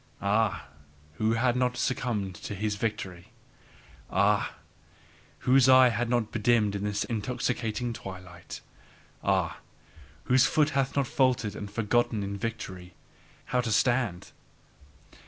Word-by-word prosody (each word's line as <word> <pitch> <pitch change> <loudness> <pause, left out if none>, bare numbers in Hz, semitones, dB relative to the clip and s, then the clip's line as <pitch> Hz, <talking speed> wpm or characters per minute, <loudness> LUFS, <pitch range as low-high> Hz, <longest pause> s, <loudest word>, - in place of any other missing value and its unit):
Ah, 100 -5 +1 0.5
who 110 +1 +1
hath 120 +2 +2
not 125 -1 0
succumbed 110 -7 -1
to 105 - -7
his 105 +2 -1
victory! 95 -6 -4 0.8
Ah, - - +2 0.9
whose 130 0 +5
eye 130 -1 +8
hath 120 +1 -1
not 120 -3 0
bedimmed 110 -2 +2
in 100 0 -3
this 105 0 -1
intoxicated 120 +1 -2
twilight! 90 -4 -9 0.6
Ah, - - 0 0.6
whose 130 +1 +4
foot 155 0 +2
hath 135 -1 0
not 140 -1 +2
faltered 125 -5 +1
and 105 -1 -6
forgotten 115 +1 0
in 100 0 -4
victory 95 -4 -6 0.5
how 125 - +1
to 115 -2 -3
stand! 115 -4 +1
115 Hz, 120 wpm, -28 LUFS, 100-125 Hz, 0.9 s, eye